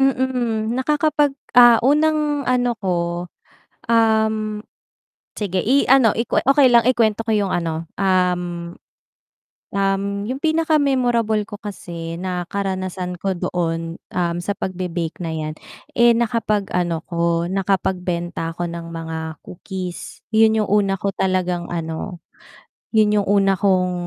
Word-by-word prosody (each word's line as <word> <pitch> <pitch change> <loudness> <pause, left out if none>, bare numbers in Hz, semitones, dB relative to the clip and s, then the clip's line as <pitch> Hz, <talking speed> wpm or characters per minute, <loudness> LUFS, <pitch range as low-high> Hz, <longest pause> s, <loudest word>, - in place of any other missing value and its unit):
Mm, 250 -4 0
nakakapag 290 +1 +1 0.2
ah, 240 -1 +8
unang 300 0 +2
ano 245 -1 +2
ko, 190 -2 -1 1.0
um 220 -2 +2 0.8
sige 190 -3 -1
i-ano 265 -1 +5
ikuwe 230 0 0
okay 275 +1 +6
lang 235 -1 +5
i-kuwento 230 -3 +2
ko 225 - -1
'yung 205 -2 +1
ano 165 -1 -3
um 180 -2 0 1.0
um, 195 0 +1 0.2
'yung 260 +2 -3
pinaka 320 0 +2
memorable 240 -6 +1
ko 205 - -7
kasi 170 -5 -7
na 180 -1 -3
karanasan 185 -2 -3
ko 190 +2 -2
doon, 165 -2 -2 0.2
um, 170 -1 -1
sa 205 - 0
pagbe-bake 175 -4 -4
na 165 - -3
'yan, 155 -1 -3 0.4
eh, 235 0 +6
nakapag-ano 210 -7 0
ko, 170 0 0
nakapagbenta 180 -3 -1
ako 175 +1 -4
ng 170 0 -7
mga 160 -1 -6
cookies. 185 -1 -7
'Yun 220 0 +4
'yung 210 - -3
una 200 -1 +2
ko 200 - -1
talagang 180 -2 0
ano 165 +1 -4 0.8
'yun 215 -1 +4
'yung 200 - -4
una 195 -1 +3
kong, 185 -2 +2
195 Hz, 125 wpm, -21 LUFS, 175-235 Hz, 1.0 s, ah